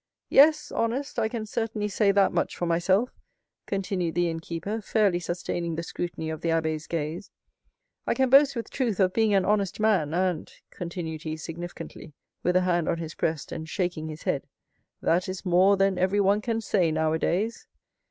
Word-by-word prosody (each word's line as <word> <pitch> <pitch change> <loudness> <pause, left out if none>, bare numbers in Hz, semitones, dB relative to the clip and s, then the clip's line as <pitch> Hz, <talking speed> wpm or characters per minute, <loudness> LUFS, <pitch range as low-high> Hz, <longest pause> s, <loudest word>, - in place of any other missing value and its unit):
"Yes, 300 +1 +5
honest—I 230 0 -1
can 225 -2 -4
certainly 215 -1 -2
say 205 0 +2
that 200 -1 +3
much - - -1
for 175 - -1
myself," 185 +7 +2 0.6
continued 185 -4 -2
the 175 -1 +2
innkeeper, 165 +6 -4
fairly 205 -4 +2
sustaining 175 -1 -3
the 165 - -3
scrutiny 165 -2 -4
of 160 - -6
the 165 - -1
abbé's 160 -1 0
gaze; 165 +4 -3 0.8
"I - - +2
can 265 +1 +3
boast 275 0 +6
with 230 - -5
truth 235 -7 -1
of 185 -1 +3
being 220 -2 +3
an 190 -1 +3
honest 200 -2 0
man; 205 -9 +2
and," 180 -3 -1 0.2
continued 170 -3 -5
he 155 0 -4
significantly, 165 -1 -8 0.3
with 180 +1 +1
a 185 - +5
hand 175 -2 +1
on - - +1
his 160 -1 -6
breast 160 -2 -2
and 160 0 -6
shaking 175 -3 -2
his 155 0 -8
head, - - -1 0.6
"that 180 +2 +2
is 185 +1 -6
more 185 +3 +5
than 195 -1 +2
everyone 200 +2 +3
can 225 0 -1
say 185 -6 +1
nowadays." 160 +7 0
185 Hz, 170 wpm, -26 LUFS, 165-210 Hz, 0.8 s, boast